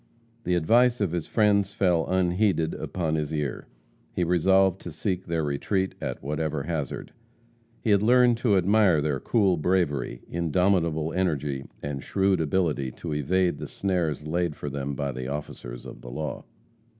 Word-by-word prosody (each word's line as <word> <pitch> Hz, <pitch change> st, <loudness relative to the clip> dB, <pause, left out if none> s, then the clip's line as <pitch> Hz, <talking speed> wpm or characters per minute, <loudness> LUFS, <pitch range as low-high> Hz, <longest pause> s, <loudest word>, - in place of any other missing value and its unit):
The 90 Hz, -, +2 dB
advice 120 Hz, +9 st, +4 dB
of 100 Hz, -5 st, 0 dB
his 85 Hz, -2 st, -3 dB
friends 100 Hz, -2 st, +2 dB
fell 90 Hz, -4 st, +2 dB
unheeded 95 Hz, -2 st, +1 dB
upon 85 Hz, -4 st, -3 dB
his 75 Hz, -1 st, -1 dB
ear. 75 Hz, -4 st, -3 dB, 0.5 s
He 90 Hz, -, +1 dB
resolved 95 Hz, +2 st, +3 dB
to 85 Hz, -, -7 dB
seek 95 Hz, +2 st, -2 dB
their 85 Hz, -1 st, -1 dB
retreat 95 Hz, +7 st, -1 dB
at -, -, -4 dB
whatever 75 Hz, 0 st, -2 dB
hazard. 75 Hz, -3 st, -4 dB, 0.7 s
He 110 Hz, -, +2 dB
had 100 Hz, -1 st, +4 dB
learned 120 Hz, +1 st, +5 dB
to 115 Hz, -5 st, +2 dB
admire 95 Hz, -2 st, +4 dB
their 75 Hz, -2 st, 0 dB
cool 100 Hz, -, +2 dB
bravery, 75 Hz, -8 st, 0 dB
indomitable 85 Hz, -1 st, +1 dB
energy, 75 Hz, -7 st, -1 dB, 0.2 s
and 70 Hz, -1 st, -4 dB
shrewd 95 Hz, +2 st, +1 dB
ability 80 Hz, -4 st, 0 dB
to 80 Hz, -3 st, -5 dB
evade 85 Hz, +3 st, +1 dB
the -, -, -5 dB
snares 85 Hz, -7 st, -1 dB
laid 85 Hz, 0 st, -1 dB
for 70 Hz, -, -5 dB
them 70 Hz, 0 st, -3 dB
by 70 Hz, -1 st, -2 dB
the 65 Hz, 0 st, -5 dB
officers 65 Hz, -4 st, -6 dB
of -, -, -10 dB
the -, -, -9 dB
law. 75 Hz, +4 st, -5 dB
85 Hz, 160 wpm, -26 LUFS, 75-95 Hz, 0.7 s, learned